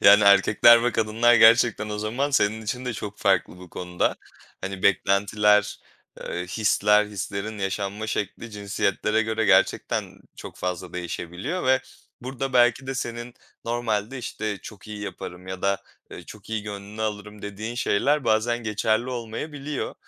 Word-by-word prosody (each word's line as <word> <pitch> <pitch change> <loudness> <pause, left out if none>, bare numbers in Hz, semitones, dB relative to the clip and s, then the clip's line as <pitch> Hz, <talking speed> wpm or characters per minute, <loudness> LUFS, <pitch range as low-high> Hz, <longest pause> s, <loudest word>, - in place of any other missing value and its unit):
Yani, 100 +1 +7
erkekler 105 +4 +6
ve 125 - +1
kadınlar 115 +2 +3
gerçekten 115 -1 +5
o 105 0 -4
zaman 120 +7 -1
senin 110 -5 +1
için 125 +4 -4
de 125 - -2
çok 105 -1 -7
farklı 95 -3 +1
bu 90 -1 -13
konuda. 90 -1 -1 0.4
Hani, 95 0 -5
beklentiler, 105 +1 +3 0.4
eee, 90 +1 -4
hisler, 105 +1 +3
hislerin 105 +1 -5
yaşanma 100 +2 -3
şekli 110 +1 -4
cinsiyetlere 105 +1 0
göre 110 0 -1
gerçekten 100 -3 +1 0.2
çok - - -10
fazla 90 0 -4
değişebiliyor 90 - -4
ve 130 0 +4 0.4
burada 130 +1 -4
belki 120 +1 +3
de 135 - -3
senin 120 -1 -5 0.3
normalde, 115 0 -2
işte, 110 -4 -4
"Çok 105 0 -11
iyi 105 -1 -7
yaparım." 95 -2 -7
ya 95 0 -7
da, 100 0 0 0.3
eee, - - -9
"Çok 105 0 -13
iyi 110 -2 -2
gönlünü 105 +1 -7
alırım." 105 -1 -5
dediğin 105 +3 -5
şeyler 135 +5 +1
bazen 115 +2 +2
geçerli 110 +3 0
olmayabiliyor. 135 +5 -5
105 Hz, 145 wpm, -24 LUFS, 100-120 Hz, 0.4 s, Yani